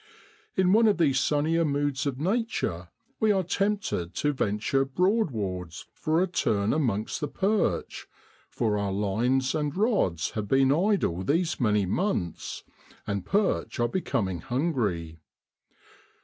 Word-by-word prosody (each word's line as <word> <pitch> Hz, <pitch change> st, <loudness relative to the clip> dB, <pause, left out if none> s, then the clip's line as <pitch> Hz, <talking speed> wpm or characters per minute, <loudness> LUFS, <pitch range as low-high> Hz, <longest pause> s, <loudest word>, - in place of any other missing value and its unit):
In 185 Hz, 0 st, +3 dB
one 225 Hz, +1 st, +5 dB
of 210 Hz, -, +3 dB
these 140 Hz, -6 st, +3 dB
sunnier 155 Hz, +4 st, +1 dB
moods 145 Hz, -2 st, 0 dB
of 135 Hz, -2 st, -3 dB
Nature 190 Hz, -, -1 dB, 0.3 s
we 220 Hz, -1 st, +3 dB
are 190 Hz, -2 st, +2 dB
tempted 195 Hz, -, -1 dB
to 145 Hz, 0 st, 0 dB
venture 110 Hz, +3 st, 0 dB
Broadwards 130 Hz, -, -1 dB
for 160 Hz, +3 st, +1 dB
a -, -, 0 dB
turn 105 Hz, -, 0 dB
amongst 115 Hz, -5 st, -1 dB
the 150 Hz, -, -1 dB
perch, 200 Hz, +7 st, -1 dB, 0.4 s
for 105 Hz, -3 st, 0 dB
our 100 Hz, -1 st, -1 dB
lines 115 Hz, +7 st, +1 dB
and 150 Hz, 0 st, -2 dB
rods 195 Hz, -, +1 dB
have 105 Hz, -2 st, -4 dB
been 135 Hz, +4 st, +3 dB
idle 170 Hz, -, +1 dB
these 165 Hz, -, 0 dB
many 105 Hz, -5 st, +2 dB
months, 95 Hz, -, -2 dB, 0.4 s
and 100 Hz, -1 st, -3 dB
perch 200 Hz, -, 0 dB
are 120 Hz, -, +3 dB
becom 120 Hz, -, -1 dB
ing 90 Hz, -2 st, -4 dB
hungry. 105 Hz, -, -2 dB
135 Hz, 135 wpm, -27 LUFS, -, 0.4 s, one